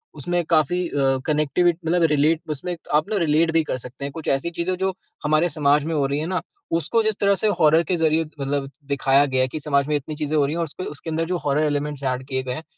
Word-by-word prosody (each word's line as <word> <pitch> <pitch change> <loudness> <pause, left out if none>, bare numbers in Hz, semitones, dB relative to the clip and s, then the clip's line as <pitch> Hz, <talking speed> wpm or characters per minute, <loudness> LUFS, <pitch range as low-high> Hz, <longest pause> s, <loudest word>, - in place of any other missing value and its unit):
उसमें 175 +4 -1
काफ़ी 170 +3 +2
अ, 135 -2 +1
कनेक्टिव 155 +3 +1
मतलब 170 0 +1
रिलेट 155 +2 +3
उसमें 175 +4 -3 0.2
आप 155 +5 +2
ना 215 - 0
रिलेट 165 -1 +2
भी 165 0 +3
कर 150 - -3
सकते 125 +2 -8
हैं 140 - -4
कुछ 160 +2 -8
ऐसी 135 +5 0
चीज़ें 170 +2 -2
जो 190 +1 0 0.3
हमारे 155 +3 +2
समाज 145 -2 +2
में 165 - -2
हो 145 -2 +2
रही 140 +1 -1
है 155 - -2
ना 185 0 -1 0.4
उसको 195 +8 +1
जिस 220 -1 +1
तरह 200 0 +3
से 205 +3 +1
हॉरर 160 +2 +5
के 180 +3 -1
ज़रिए 160 -1 +2 0.2
मतलब 140 0 -2 0.2
दिखाया 140 0 +3
गया 130 -2 +1
है 130 - +2
कि 140 +5 -5
समाज 140 -2 +1
में 150 - +1
इतनी 145 +2 -4
चीज़ें 150 0 -2
हो 145 - +4
रही 145 - -2
हैं - - -3
और - - +1
उसके 165 +3 -6
उसके 150 +2 -7
अंदर 160 +1 -1
जो 180 +2 -1
हॉरर 145 +2 +2
एलिमेंट्स 145 -1 -2
एड 130 -1 -1
किए 130 -1 -2
गए 125 -1 -3
हैं 155 - -6
150 Hz, 260 wpm, -23 LUFS, 140-170 Hz, 0.4 s, हॉरर